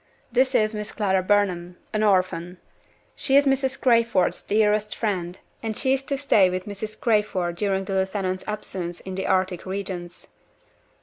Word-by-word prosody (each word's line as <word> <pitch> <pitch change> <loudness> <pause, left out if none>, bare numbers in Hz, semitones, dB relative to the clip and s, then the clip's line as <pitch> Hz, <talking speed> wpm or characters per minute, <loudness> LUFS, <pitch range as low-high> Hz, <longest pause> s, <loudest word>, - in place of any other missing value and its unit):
This 260 +2 +2
is 215 0 +3
Miss 210 0 -5
Clara 190 -3 +1
Burnham 180 -3 0 0.2
an 215 - 0
orphan. 185 -3 +1 0.6
She 270 0 +3
is 285 - +5
Mrs. 270 -1 +1
Crayford's 230 -6 +2
dearest 210 0 +1
friend, 185 -5 -2 0.2
and 220 -2 -3
she 265 -1 +3
is 270 - 0
to 275 - -2
stay 215 -9 +4
with 185 0 -3
Mrs. 210 +1 -6
Crayford 210 -6 +1
during 195 -1 0
the 195 - -4
lieutenant's 190 -1 -1
absence 185 -4 -5
in 190 - -7
the 190 +1 -3
Arctic 185 -1 +1
regions. 185 -2 -6
200 Hz, 160 wpm, -24 LUFS, 185-220 Hz, 0.6 s, is